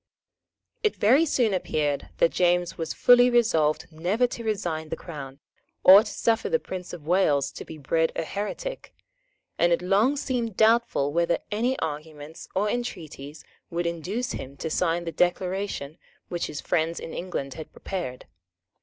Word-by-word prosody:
It 430 -3 +1
very 270 +10 +4
soon 240 -7 +2
appeared 150 -5 -1
that 165 - +4
James 175 -1 +1
was 165 -1 -4
fully 245 0 +6
resolved 165 -11 +2
never 180 +10 +1
to 240 -1 -5
resign 170 -8 -2
the - - -2
Crown, 140 -5 -9 0.4
or 190 +2 +10
to 215 -1 -6
suffer 225 -1 0
the 485 - +3
Prince 185 - -7
of 170 -4 -9
Wales 150 -5 +2
to - - -8
be 160 - -10
bred 160 +3 +1
a - - -1
heretic; 210 - -5 0.6
and 175 - +4
it 170 - +2
long 210 +10 +3
seemed 240 -7 -2
doubtful 220 -11 +3
whether 170 +1 +2
any 240 +5 0
arguments 155 0 -6
or 200 +3 +2
entreaties 160 - -5 0.3
would 170 +1 -2
induce 180 +9 -2
him 135 +2 -7
to 160 - -4
sign 170 0 +1
the 165 - -4
Declaration 180 -2 -1 0.3
which 175 -1 -2
his 150 - -6
friends 165 +1 0
in 165 - -7
England 155 -7 -4
had 160 +3 -9
prepared. 170 -10 -5
175 Hz, 160 wpm, -26 LUFS, 155-215 Hz, 0.6 s, or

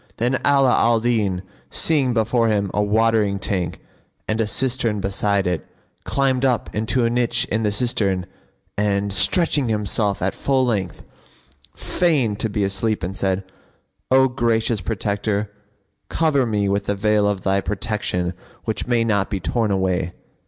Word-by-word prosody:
Then 125 +3 0
Ala 135 -3 +4
al 115 -1 +3
Din 105 -6 0 0.3
seeing 145 -6 +2
before 115 0 +1
him 100 -3 0
a 105 - +1
watering 105 -1 +2
tank 95 -3 -2 0.5
and 110 +1 0
a 110 - 0
cistern 120 -3 0
beside 100 +1 0
it, 90 -2 -2 0.4
climbed 135 -2 +1
up 125 -3 0
into 110 +3 0
a - - +2
niche 120 0 +1
in 110 - +1
the 105 -2 +1
cistern 100 -5 0 0.5
and, 100 -1 0
stretching 140 - +3
himself 105 -1 0
at 95 - 0
full 135 -2 +1
length, 100 -8 -2 0.7
feigned 135 - 0
to 110 - +1
be 105 0 -1
asleep 105 +2 -1
and 95 +3 -3
said, 95 -1 -1 0.7
"O 130 0 +5
gracious 115 -3 0
Protector, 100 +1 -2 0.6
cover 145 -6 +1
me 105 -2 0
with 100 0 0
the 100 - -1
veil 105 0 +2
of 100 -2 -1
Thy 95 +1 +1
protection 95 -3 -2 0.3
which 110 +1 -2
may 120 -2 +2
not 100 -4 0
be 100 - -2
torn 110 +4 -1
away!" 95 -2 0
105 Hz, 150 wpm, -21 LUFS, 100-120 Hz, 0.7 s, O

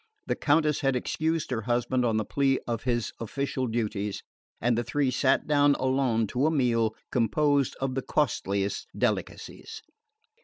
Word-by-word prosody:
The - - -1
Countess 150 0 +2
had 135 -2 +1
excused 160 +5 -1
her 115 -3 -1
husband 120 +2 0
on 110 -2 +1
the 110 - 0
plea 135 +2 +1
of 115 0 -3
his 120 -3 -1
official 130 +2 -2
duties, 105 -3 -2 0.4
and 120 +1 +2
the 120 - 0
three 140 +2 0
sat 125 - +2
down 145 -1 +4
alone 130 -4 +1
to 130 +4 +2
a - - +4
meal 115 -7 +1 0.2
composed 140 +3 +2
of 135 -1 -1
the 135 - -1
costliest 100 -9 -1
delicacies. 445 -1 -3
130 Hz, 155 wpm, -27 LUFS, 115-145 Hz, 0.4 s, down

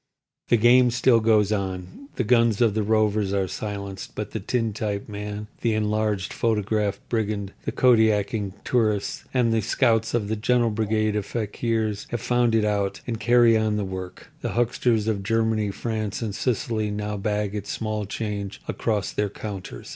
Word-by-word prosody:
The 120 - +4
game 120 +2 +6
still 120 0 +4
goes 110 -2 +3
on. 95 +4 -4
The 125 - 0
guns 115 -2 +3
of 115 -4 +3
the 110 - 0
rovers 105 -2 +1
are 95 -1 +1
silenced; 100 -1 -6
but - - -4
the - - -3
tintype 110 -4 -2
man, 105 0 -5 0.2
the 115 -2 +1
enlarged 105 -2 0
photograph 105 -2 0
brigand, 105 -3 -2
the - - -1
kodaking 110 -4 +3
tourist 110 -5 0
and 120 -3 +2
the 110 - +2
scouts 115 0 +2
of 110 -4 0
the 110 - -1
gentle 120 +2 +2
brigade 110 0 0
of 105 -2 -2
fakirs 110 -1 -2
have 120 - -2
found 120 -1 +2
it 110 -1 +3
out, 100 -2 -1
and 115 -2 -3
carry 120 0 +5
on 110 -1 +1
the 105 - -1
work. 95 -1 -7
The - - -3
hucksters 120 -2 +1
of 105 -3 0
Germany, 110 0 +1
France, 110 +1 -3
and 105 -3 -3
Sicily 110 -1 -1
now 105 0 -3
bag 105 0 -1
its 105 -1 -5
small 110 -2 -3
change 100 -2 -4
across 105 -5 -1
their 105 -1 -1
counters. 95 - -7
110 Hz, 170 wpm, -24 LUFS, 105-115 Hz, 0.2 s, game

